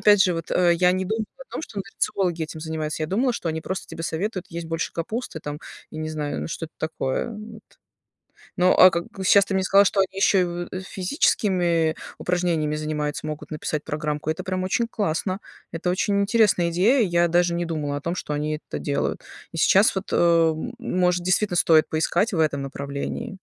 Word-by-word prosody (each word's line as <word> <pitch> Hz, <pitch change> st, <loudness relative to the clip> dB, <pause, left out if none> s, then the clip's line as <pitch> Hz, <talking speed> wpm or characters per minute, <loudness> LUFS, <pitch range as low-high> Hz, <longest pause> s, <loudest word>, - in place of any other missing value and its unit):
опять 205 Hz, -2 st, +6 dB
же, 180 Hz, -2 st, +2 dB
вот, 165 Hz, -1 st, -5 dB
а, 175 Hz, -1 st, +3 dB
я 180 Hz, +1 st, +4 dB
не 185 Hz, 0 st, -1 dB
думала 220 Hz, +3 st, -1 dB
о -, -, -10 dB
том, -, -, -4 dB
что 210 Hz, -, -7 dB
нутрициологи 185 Hz, -3 st, -1 dB
этим 155 Hz, 0 st, -6 dB
занимаются. 155 Hz, -1 st, -3 dB
Я -, -, 0 dB
думала, 240 Hz, -, +1 dB
что 170 Hz, -, -4 dB
они 160 Hz, 0 st, -2 dB
просто 190 Hz, +3 st, -4 dB
тебе 165 Hz, -, -8 dB
советуют 185 Hz, +3 st, -3 dB
есть 170 Hz, -1 st, -6 dB
больше 165 Hz, 0 st, -3 dB
капусты 170 Hz, 0 st, -4 dB
там, 145 Hz, 0 st, -5 dB, 0.3 s
я 155 Hz, -, -8 dB
не 155 Hz, -, -3 dB
знаю, 150 Hz, -2 st, -3 dB
ну, -, -, -5 dB
что-то 165 Hz, -1 st, -6 dB
такое. 155 Hz, -, -2 dB
Вот. 220 Hz, 0 st, -9 dB, 1.0 s
Ну, 180 Hz, +1 st, +4 dB
а 185 Hz, -, +8 dB
как 170 Hz, 0 st, -2 dB, 0.2 s
Щас 200 Hz, +1 st, +6 dB
ты 195 Hz, -, -4 dB
мне 190 Hz, 0 st, +1 dB
сказала, 200 Hz, +2 st, +5 dB
что 195 Hz, -, +1 dB
они 190 Hz, -, +2 dB
еще 190 Hz, -2 st, +4 dB
в 175 Hz, 0 st, -5 dB
физическими 180 Hz, -, +1 dB, 0.2 s
упражнениями 170 Hz, -4 st, 0 dB
занимаются, 150 Hz, -1 st, -3 dB
могут 150 Hz, -1 st, -6 dB
написать 155 Hz, 0 st, -3 dB
программку. 150 Hz, 0 st, -3 dB
Это 160 Hz, -, -2 dB
прям 185 Hz, -1 st, -2 dB
очень 230 Hz, +5 st, 0 dB
классно. 185 Hz, -2 st, -1 dB, 0.3 s
Это 165 Hz, +2 st, -2 dB
очень 200 Hz, +2 st, +1 dB
интересная 200 Hz, -5 st, +3 dB
идея. 200 Hz, +11 st, +3 dB
Я 175 Hz, -3 st, +3 dB
даже 175 Hz, 0 st, +2 dB
не 175 Hz, 0 st, -1 dB
думала 150 Hz, -3 st, -2 dB
о 145 Hz, -, -6 dB
том, 170 Hz, +3 st, -2 dB
что 150 Hz, -, -4 dB
они 150 Hz, +1 st, -1 dB
это -, -, -4 dB
делают. 140 Hz, -1 st, -2 dB, 0.3 s
И 165 Hz, -, -6 dB
сейчас 195 Hz, +6 st, +5 dB
вот, 190 Hz, -, -2 dB
а, 165 Hz, -1 st, +4 dB, 0.3 s
может 180 Hz, -6 st, +1 dB
действительно 185 Hz, +1 st, +1 dB
стоит 160 Hz, -2 st, +5 dB
поискать 165 Hz, +7 st, +1 dB
в 170 Hz, -, 0 dB
этом 145 Hz, -3 st, +1 dB
направлении. 140 Hz, -, -5 dB
175 Hz, 195 wpm, -24 LUFS, 155-190 Hz, 1.0 s, а